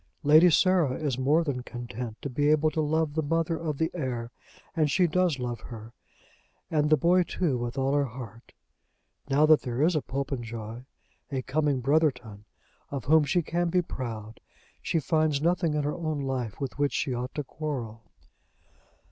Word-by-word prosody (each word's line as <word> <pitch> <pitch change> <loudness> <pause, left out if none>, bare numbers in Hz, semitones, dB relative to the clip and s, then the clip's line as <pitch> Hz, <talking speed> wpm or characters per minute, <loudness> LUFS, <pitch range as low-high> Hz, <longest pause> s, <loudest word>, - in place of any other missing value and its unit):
Lady 155 +4 +7
Sarah 175 -5 +3
is 140 -5 -2
more 150 +6 +3
than 140 -5 -2
content 120 -2 -7
to 140 - -3
be 145 +3 +1
able 155 0 +3
to 155 - -1
love 155 0 0
the 160 - 0
mother 165 +2 0
of 155 -3 -3
the 160 +1 0
heir, 125 -7 -3 0.4
and 155 -3 +2
she 180 +5 +3
does 175 -2 +1
love 120 -2 -4
her, 115 -1 -10 0.8
and 150 -2 +2
the 155 - +5
boy 180 +3 +4
too, 170 -4 -1
with 120 +2 -4
all 135 +1 +1
her 145 -1 +2
heart. 115 -2 -10 0.8
Now 145 +3 +4
that 155 -1 +6
there 125 +2 -1
is 170 +2 +3
a 155 - +1
Popenjoy, 120 -4 -5 0.5
a 130 -2 -2
coming 145 -2 0
Brotherton, 125 -7 0 0.4
of 140 -4 -5
whom 155 +2 +5
she 170 +5 +1
can 175 +2 -1
be 180 +1 +2
proud, 115 -7 -6 0.4
she 165 - 0
finds 155 -1 +1
nothing 170 0 +1
in 150 - 0
her 145 +1 -1
own 155 -3 -3
life 130 -6 -3
with 135 0 -5
which 145 -1 +1
she 135 - -1
ought 125 +1 -4
to 150 - -2
quarrel. 130 -7 -5
145 Hz, 180 wpm, -27 LUFS, 125-155 Hz, 0.8 s, Lady